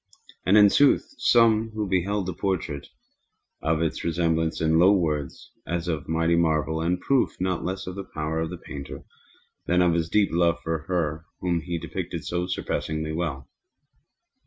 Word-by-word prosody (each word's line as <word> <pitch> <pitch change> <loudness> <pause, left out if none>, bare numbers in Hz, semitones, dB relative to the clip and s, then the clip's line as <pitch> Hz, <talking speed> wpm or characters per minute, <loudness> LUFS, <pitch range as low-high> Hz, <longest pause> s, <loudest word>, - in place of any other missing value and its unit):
And 100 +3 +6
in 105 -1 +7
sooth 145 - +3
some 115 -2 +4
who 105 -1 -2
beheld 95 +2 0
the 90 - -3
portrait 85 -6 -3
spoke - - -31 0.7
of 80 0 0
its 80 - -2
resemblance 80 -1 0
in 80 0 +3
low 90 +3 +7
words, 75 -7 -1 0.2
as 85 0 -2
of 80 -5 -2
a - - -23
mighty 80 +1 +2
marvel, 80 -2 +1
and 85 +2 +1
a - - -19
proof 135 -2 +1
not 90 -2 -1
less 95 +1 -3
of 90 - -5
the 100 +1 -6
power 80 +1 -2
of 80 0 -2
the 90 - -6
painter 70 -4 -8 0.6
than 90 +1 +3
of 85 -1 +3
his 80 -1 0
deep 105 +1 +3
love 85 0 +2
for 80 -1 -3
her 80 -3 -1
whom 85 -2 0
he 85 +1 -3
depicted - - -5
so 90 0 -2
surpassingly 80 -3 -3
well. 80 -5 -3
85 Hz, 180 wpm, -25 LUFS, 80-95 Hz, 0.7 s, in